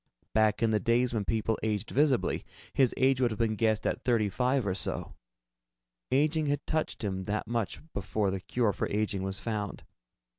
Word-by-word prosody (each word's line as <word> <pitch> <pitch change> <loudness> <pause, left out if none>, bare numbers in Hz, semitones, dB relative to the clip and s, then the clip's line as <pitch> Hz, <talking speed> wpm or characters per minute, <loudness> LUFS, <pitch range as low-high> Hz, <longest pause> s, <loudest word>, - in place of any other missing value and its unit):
Back 110 0 +3
in 115 - +3
the 105 - +3
days 120 +4 +2
when 105 -3 -1
people 110 0 0
aged 110 0 -1
visibly, 140 -3 +2 0.3
his 135 -3 +4
age 130 0 +3
would 125 - +4
have 110 - -4
been 115 -1 +1
guessed 110 0 +1
at - - -1
thirty 115 -4 +2
five 125 +3 +1
or 95 - 0
so. 95 - -2 1.0
Aging 150 +3 +2
had 145 0 -1
touched 155 -6 -2
him 95 -2 -2
that 105 +2 -1
much 115 -3 -2
before 100 +1 -1
the 95 - -2
cure 105 +3 0
for - - -2
aging 105 -2 0
was 95 0 -3
found. 105 -3 -4
110 Hz, 185 wpm, -30 LUFS, 105-125 Hz, 1.0 s, his